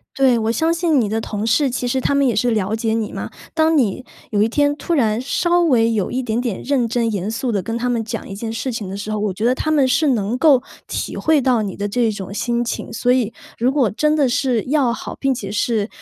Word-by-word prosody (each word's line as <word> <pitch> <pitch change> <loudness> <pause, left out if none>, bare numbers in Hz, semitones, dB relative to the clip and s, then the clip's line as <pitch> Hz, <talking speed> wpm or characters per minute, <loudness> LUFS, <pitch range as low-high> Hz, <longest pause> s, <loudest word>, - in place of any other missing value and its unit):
对， 265 -3 +4
我 220 0 0
相 320 +8 +1
信 335 -4 +2
你 225 - +1
的 220 +2 -1
同 210 -1 -4
事， 265 +5 +2
其 250 0 -2
实 260 +2 0
他 280 - +1
们 280 0 +3
也 240 -5 +1
是 245 +4 +2
了 215 -1 0
解 225 0 -1
你 225 -2 -1
嘛， - - -5 0.2
当 320 0 +3
你 250 -2 +1 0.3
有 205 -2 +2
一 220 - +3
天 290 +4 +2
突 330 +4 -2
然 225 -5 +1
稍 345 +6 +1
微 235 -9 +3
有 205 -4 0
一 260 +1 -2
点 230 0 -1
点 235 -6 -3
认 265 -4 +1
真 230 -1 0
严 200 -1 -2
肃 240 +3 -2
地 200 -3 0
跟 225 +5 -3
他 245 +1 -2
们 240 -2 0
讲 225 0 -5
一 - - -7
件 220 +3 -5
事 230 +3 -3
情 215 -5 -5
的 195 - -5
时 205 +1 -5
候， 215 - -1
我 210 -1 0
觉 210 +5 -3
得 245 - +4
他 310 - -3
们 290 -4 +3
是 280 +5 +2
能 225 -3 0
够 275 -3 +5 0.3
体 - - -4
会 315 -1 +2
到 250 -3 +2
你 200 -3 -4
的 205 - -3
这 230 +2 +1
种 200 -2 -7
心 240 +3 -1
情。 230 - -4
所 230 +2 +1
以 240 -4 +1 0.3
如 245 +3 +2
果 265 -8 +2
真 300 +7 +1
的 290 -3 +3
是 245 -2 +1
要 270 -3 +2
好， 235 - -6
并 270 -1 +1
且 200 -5 -6
是， 210 0 0
235 Hz, 285 characters per minute, -20 LUFS, 215-270 Hz, 0.3 s, 够